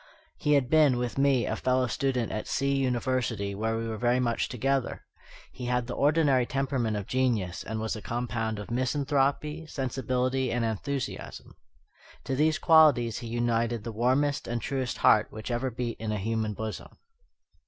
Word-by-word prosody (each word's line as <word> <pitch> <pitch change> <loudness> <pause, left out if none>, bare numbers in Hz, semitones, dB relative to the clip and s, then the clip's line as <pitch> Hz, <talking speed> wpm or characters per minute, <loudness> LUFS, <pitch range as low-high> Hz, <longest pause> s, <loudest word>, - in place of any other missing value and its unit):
He 150 - +1
had 140 -3 +3
been, 150 -3 +4
with 125 +2 -2
me, 135 -4 +3
a 110 - -1
fellow 130 +2 +1
student 125 -2 -1
at 110 - -4
C 140 0 0
University, 125 -5 -1
where 110 +3 -1
we 115 0 -3
were 110 -1 -4
very 120 +1 +2
much 120 -2 0
together. 135 +1 -1 0.5
He 125 - -7
had 125 0 0
the 125 - -5
ordinary 140 -4 +3
temperament 130 -5 -1
of 100 - -4
genius, 115 -9 0
and 110 0 -4
was 110 +1 -2
a 110 - -7
compound 115 -1 -2
of 105 +2 -7
misanthropy, 140 +4 0
sensibility, 130 -1 -1
and 120 -1 0
enthusiasm. 110 - -4 0.7
To 135 - -2
these 155 +3 +2
qualities 145 -9 +5
he 120 - -7
united 115 -1 0
the 115 - -5
warmest 130 +6 +1
and 120 0 -2
truest 130 +1 -3
heart 105 - +5
which 110 +3 -7
ever 120 +2 -1
beat 120 -1 -4
in 110 -1 -3
a 105 - -1
human 110 +1 -2
bosom. 110 0 -6
125 Hz, 170 wpm, -28 LUFS, 115-135 Hz, 0.7 s, qualities